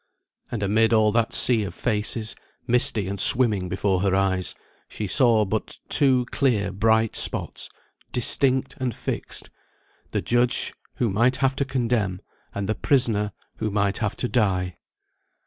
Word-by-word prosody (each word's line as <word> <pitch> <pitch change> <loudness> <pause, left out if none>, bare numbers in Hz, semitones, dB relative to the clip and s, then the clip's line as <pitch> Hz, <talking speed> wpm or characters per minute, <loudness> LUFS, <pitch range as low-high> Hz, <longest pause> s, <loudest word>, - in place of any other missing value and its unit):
And 110 -4 -4
amid 110 +3 +2
all 110 -1 +3
that 115 0 0
sea 115 -4 +5
of 90 -4 -7
faces, 110 -1 -2 0.3
misty 115 -4 +2
and 100 0 -4
swimming 105 -8 +4
before 95 0 -1
her 95 -1 +1
eyes, 95 -1 0 0.3
she 105 - -5
saw 115 0 +3
but 95 - -4
two 130 -3 +4
clear 110 -9 0
bright 110 +2 +1
spots, - - 0 0.4
distinct 130 +1 +1
and 125 -3 -3
fixed: - - -5 0.6
the - - -3
judge, 120 0 +1 0.2
who 115 -4 -1
might 120 +6 +2
have 135 0 0
to 140 - 0
condemn; 115 -8 -1 0.4
and 100 -1 -3
the 110 - 0
prisoner, 110 -6 +1 0.3
who 110 - -2
might 100 -1 -1
have 105 -3 -2
to 125 - -2
die. 95 - -1
110 Hz, 145 wpm, -23 LUFS, 100-125 Hz, 0.6 s, sea